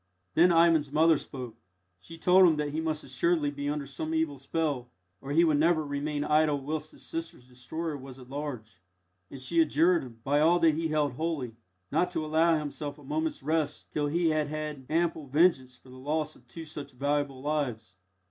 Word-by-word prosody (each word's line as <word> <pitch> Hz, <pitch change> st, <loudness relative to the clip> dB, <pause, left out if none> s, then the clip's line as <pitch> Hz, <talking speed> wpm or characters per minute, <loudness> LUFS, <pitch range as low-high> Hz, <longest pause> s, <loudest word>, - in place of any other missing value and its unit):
Then 175 Hz, +2 st, +5 dB
Ivan's 165 Hz, -4 st, +4 dB
mother 160 Hz, +2 st, +5 dB
spoke. 125 Hz, -4 st, -8 dB, 0.4 s
She 165 Hz, -, -12 dB
told 180 Hz, +2 st, +6 dB
him 160 Hz, -, +3 dB
that 150 Hz, -1 st, -2 dB
he 155 Hz, +2 st, -2 dB
must 155 Hz, -1 st, -2 dB
assuredly 145 Hz, +3 st, +1 dB
be 145 Hz, 0 st, -4 dB
under 145 Hz, -1 st, -2 dB
some 155 Hz, +4 st, -4 dB
evil 155 Hz, -4 st, -1 dB
spell, 140 Hz, -3 st, -2 dB, 0.3 s
or 135 Hz, -, -6 dB
he 165 Hz, +4 st, +5 dB
would 155 Hz, -3 st, +3 dB
never 160 Hz, -1 st, +3 dB
remain 145 Hz, +1 st, -2 dB
idle 150 Hz, -1 st, +2 dB
whilst 155 Hz, +2 st, -4 dB
his -, -, -13 dB
sisters' 165 Hz, -6 st, -6 dB
destroyer 150 Hz, +6 st, -5 dB
was 135 Hz, -2 st, -10 dB
at 125 Hz, -2 st, -13 dB
large, 125 Hz, -9 st, -6 dB, 0.5 s
and 135 Hz, -, -9 dB
she 165 Hz, +6 st, +2 dB
adjured 165 Hz, +3 st, +3 dB
him, 115 Hz, -3 st, -11 dB
by 145 Hz, +2 st, +2 dB
all 165 Hz, +3 st, +5 dB
that 165 Hz, -2 st, +4 dB
he 165 Hz, +2 st, -1 dB
held 150 Hz, -2 st, +1 dB
holy, 140 Hz, -5 st, -3 dB, 0.4 s
not 180 Hz, -, +2 dB
to 165 Hz, -3 st, -3 dB
allow 160 Hz, +1 st, +3 dB
himself 145 Hz, -1 st, -5 dB
a 150 Hz, -, -15 dB
moment's 155 Hz, +1 st, -2 dB
rest 155 Hz, 0 st, -1 dB
till 150 Hz, -1 st, 0 dB
he 165 Hz, +3 st, +1 dB
had 155 Hz, -1 st, 0 dB
had 150 Hz, -3 st, -5 dB
ample 160 Hz, -2 st, 0 dB
vengeance 135 Hz, -4 st, +2 dB
for 130 Hz, -, -20 dB
the 130 Hz, -, -12 dB
loss 155 Hz, +3 st, -2 dB
of 125 Hz, -, -22 dB
two 160 Hz, +6 st, -9 dB
such 145 Hz, -3 st, -8 dB
valuable 140 Hz, 0 st, -1 dB
lives. 130 Hz, -9 st, -2 dB
150 Hz, 195 wpm, -29 LUFS, 140-160 Hz, 0.5 s, told